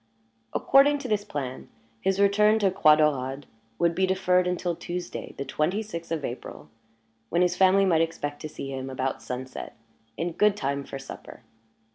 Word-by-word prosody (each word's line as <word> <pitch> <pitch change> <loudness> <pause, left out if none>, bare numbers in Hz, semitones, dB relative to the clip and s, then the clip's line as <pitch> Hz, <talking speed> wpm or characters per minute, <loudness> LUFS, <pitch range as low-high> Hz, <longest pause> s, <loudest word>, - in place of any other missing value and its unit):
According 285 +2 +4
to 275 - -6
this 210 -3 0
plan, 130 -7 -5 0.3
his 195 - 0
return 210 +2 +4
to 200 -3 +2
Croix 155 -4 +6
Daurade 140 -3 0 0.3
would 170 0 +2
be 190 +2 +1
deferred 180 -1 +2
until 180 -1 -1
Tuesday, 175 +1 -6
the 140 - -4
twenty 165 +10 -1
sixth 170 -6 -7
of 160 -4 -1
April, 120 - -7 0.6
when 175 +2 +2
his 180 0 +1
family 190 +1 +5
might 165 -4 +3
expect 145 -3 -3
to 155 - -5
see 135 -2 -7
him 130 0 -5
about 130 0 -3
sunset, 130 +1 -6 0.4
in 170 +1 -2
good 205 +4 +2
time 140 -2 -2
for 135 - -7
supper. 135 0 -10
170 Hz, 170 wpm, -26 LUFS, 140-195 Hz, 0.6 s, Croix